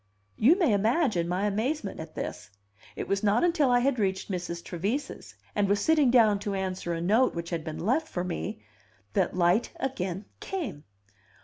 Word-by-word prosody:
You 290 Hz, -, +5 dB
may 330 Hz, -, +3 dB
imagine 215 Hz, -, +2 dB
my 180 Hz, +3 st, 0 dB
amazement 220 Hz, +3 st, -1 dB
at 160 Hz, 0 st, -8 dB
this. 105 Hz, 0 st, -5 dB, 0.5 s
It -, -, -4 dB
was 195 Hz, 0 st, 0 dB
not 210 Hz, +5 st, +3 dB
until 335 Hz, -6 st, +3 dB
I 245 Hz, 0 st, +4 dB
had 260 Hz, -1 st, +1 dB
reached 190 Hz, 0 st, -1 dB
Mrs. 175 Hz, -2 st, -4 dB
Trevise's, 210 Hz, -, -4 dB, 0.2 s
and 205 Hz, -2 st, +1 dB
was 200 Hz, 0 st, +3 dB
sitting 300 Hz, +3 st, +4 dB
down 220 Hz, -5 st, +5 dB
to 200 Hz, 0 st, -3 dB
answer 185 Hz, -3 st, -2 dB
a -, -, -3 dB
note 220 Hz, +9 st, +3 dB
which 170 Hz, +1 st, -5 dB
had 165 Hz, -2 st, -2 dB
been 155 Hz, +2 st, -5 dB
left 295 Hz, +9 st, +1 dB
for 180 Hz, -, -3 dB
me, 105 Hz, -, -4 dB, 0.5 s
that -, -, +1 dB
light 180 Hz, +6 st, +3 dB
again 195 Hz, -7 st, -3 dB
came. 315 Hz, -, -5 dB
200 Hz, 180 wpm, -28 LUFS, 180-255 Hz, 0.5 s, You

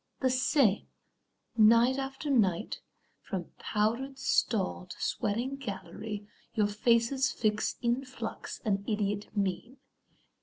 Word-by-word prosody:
The 260 Hz, -1 st, +3 dB
same, 255 Hz, -4 st, +3 dB, 0.7 s
night 230 Hz, +4 st, +6 dB
after 270 Hz, +2 st, -3 dB
night, 210 Hz, -6 st, +2 dB, 0.4 s
from 185 Hz, -5 st, -5 dB
powdered 235 Hz, +6 st, 0 dB
stall 205 Hz, -8 st, 0 dB
To -, -, -10 dB
sweating 240 Hz, +7 st, -1 dB
gallery, 205 Hz, -2 st, -6 dB, 0.3 s
your 215 Hz, -, +3 dB
faces 235 Hz, +5 st, +2 dB
fix 210 Hz, -2 st, 0 dB
In 240 Hz, +3 st, +1 dB
flux 260 Hz, 0 st, -6 dB
an 200 Hz, -2 st, +1 dB
idiot 205 Hz, -1 st, -1 dB
mean. 200 Hz, +7 st, -1 dB
225 Hz, 110 wpm, -30 LUFS, 205-260 Hz, 0.7 s, night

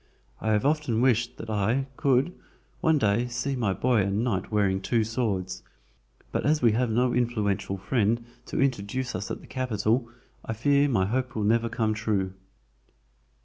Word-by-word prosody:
I 110 Hz, -, -1 dB
have 105 Hz, +4 st, +1 dB
often 145 Hz, -6 st, +1 dB
wished 120 Hz, -2 st, +2 dB
that 110 Hz, -, -6 dB
I 110 Hz, +6 st, +1 dB
could, 135 Hz, +6 st, +2 dB, 0.5 s
one 160 Hz, -1 st, +3 dB
day, 110 Hz, -1 st, +2 dB
see 120 Hz, +3 st, -2 dB
my 115 Hz, -6 st, 0 dB
boy 115 Hz, +4 st, +2 dB
a 100 Hz, -, 0 dB
knight 100 Hz, -1 st, -1 dB
wearing 100 Hz, -3 st, +1 dB
two 115 Hz, +3 st, +1 dB
swords, 100 Hz, -5 st, -2 dB, 0.7 s
but -, -, -1 dB
as 150 Hz, +1 st, +3 dB
we 120 Hz, -4 st, +4 dB
have 120 Hz, +2 st, +1 dB
no 120 Hz, +2 st, +2 dB
influential 105 Hz, -5 st, 0 dB
friend 115 Hz, +3 st, 0 dB, 0.2 s
to -, -, -3 dB
introduce 130 Hz, -1 st, -1 dB
us 100 Hz, +3 st, -4 dB
at -, -, -5 dB
the -, -, -14 dB
Capital, 120 Hz, -1 st, 0 dB, 0.3 s
I -, -, -3 dB
fear 140 Hz, +6 st, +3 dB
my 95 Hz, -7 st, +2 dB
hope 125 Hz, +4 st, -2 dB
will 110 Hz, -, -1 dB
never 115 Hz, +2 st, +2 dB
come 110 Hz, -1 st, 0 dB
true." 105 Hz, -3 st, -1 dB
115 Hz, 170 wpm, -27 LUFS, 105-125 Hz, 0.7 s, we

